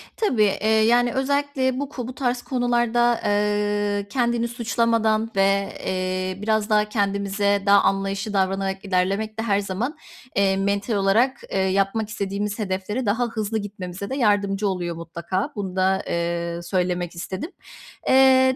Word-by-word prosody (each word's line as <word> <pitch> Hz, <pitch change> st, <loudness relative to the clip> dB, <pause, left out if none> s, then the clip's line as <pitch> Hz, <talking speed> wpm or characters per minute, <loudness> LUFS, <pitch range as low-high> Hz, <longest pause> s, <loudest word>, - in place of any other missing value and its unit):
Tabii, 255 Hz, -, +2 dB
eee, 205 Hz, +1 st, +1 dB
yani 235 Hz, +2 st, +4 dB
özellikle 270 Hz, -1 st, 0 dB
bu 285 Hz, -1 st, -3 dB
ku 250 Hz, -4 st, -6 dB
bu 255 Hz, -, -6 dB
tarz 245 Hz, -2 st, -1 dB
konularda, 240 Hz, -2 st, +1 dB
eee, 205 Hz, 0 st, 0 dB
kendini 235 Hz, -1 st, 0 dB
suçlamadan, 230 Hz, -1 st, +1 dB
ve, 195 Hz, 0 st, +2 dB, 0.2 s
eee, 185 Hz, 0 st, -2 dB
biraz 215 Hz, 0 st, 0 dB
daha 210 Hz, 0 st, +3 dB
kendimize 200 Hz, -1 st, 0 dB
daha 200 Hz, 0 st, +6 dB
anlayışlı 195 Hz, +1 st, -1 dB
davranarak 195 Hz, +1 st, -1 dB
ilerlemek 195 Hz, +4 st, 0 dB
de -, -, 0 dB
her 205 Hz, -3 st, +2 dB
zaman, 205 Hz, -, -3 dB, 0.4 s
eee, 195 Hz, -1 st, +3 dB
mental 200 Hz, +3 st, 0 dB
olarak, 210 Hz, +6 st, +2 dB
eee, -, -, -1 dB
yapmak 195 Hz, +3 st, +1 dB
istediğimiz 205 Hz, +1 st, -3 dB
hedeflere 205 Hz, +5 st, -2 dB
daha 225 Hz, +4 st, +1 dB
hızlı 220 Hz, -1 st, -2 dB
gitmemize 200 Hz, -2 st, -6 dB
de 265 Hz, -, -2 dB
yardımcı 205 Hz, -4 st, +1 dB
oluyor 175 Hz, -3 st, -2 dB
mutlaka. 170 Hz, -, -4 dB
Bunu 190 Hz, -3 st, -4 dB
da, 190 Hz, +1 st, +2 dB
eee, 170 Hz, 0 st, -2 dB
söylemek 180 Hz, -1 st, -1 dB
istedim. 190 Hz, -, -5 dB, 0.6 s
Eee, 260 Hz, 0 st, +5 dB
205 Hz, 140 wpm, -23 LUFS, 195-235 Hz, 0.6 s, daha